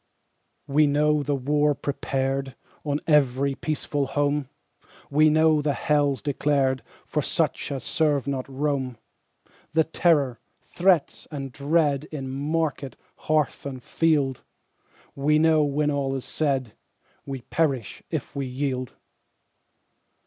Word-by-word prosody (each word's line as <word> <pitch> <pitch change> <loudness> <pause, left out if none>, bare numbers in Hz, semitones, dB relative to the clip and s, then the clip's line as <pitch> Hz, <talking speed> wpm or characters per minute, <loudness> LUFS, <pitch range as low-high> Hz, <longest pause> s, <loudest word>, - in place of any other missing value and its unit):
We 150 +1 +3
know 150 +1 +2
the 145 0 0
war 145 +2 +2
prepared 135 -1 -2 0.3
On 145 -1 -1
every 140 -2 +3
peaceful 145 -1 -2
home, 145 -1 0 0.6
We 155 +2 +5
know 155 0 +4
the 145 -1 0
hells 145 -2 +1
declared 140 -2 +1 0.2
For - - -1
such - - -1
as 135 -2 -4
serve 150 -4 +1
not 135 -2 -3
Rome 135 -3 -2 0.8
The 160 0 +4
terror, 150 -7 +2 0.2
threats, 180 -4 +1
and 135 -3 -5
dread 145 +1 +1
In 135 -4 -6
market, 145 0 -2 0.2
hearth, 155 -3 0
and 130 -3 -6
field 145 -6 +1 0.7
We 150 +2 +2
know, 160 0 +4
when 150 +1 +1
all 135 -1 -1
is 130 - -5
said, 135 -7 -1 0.5
We 135 -2 -5
perish 135 -9 -1
if - - -4
we 140 -1 -2
yield. 130 -1 -3
145 Hz, 120 wpm, -25 LUFS, 135-150 Hz, 0.8 s, We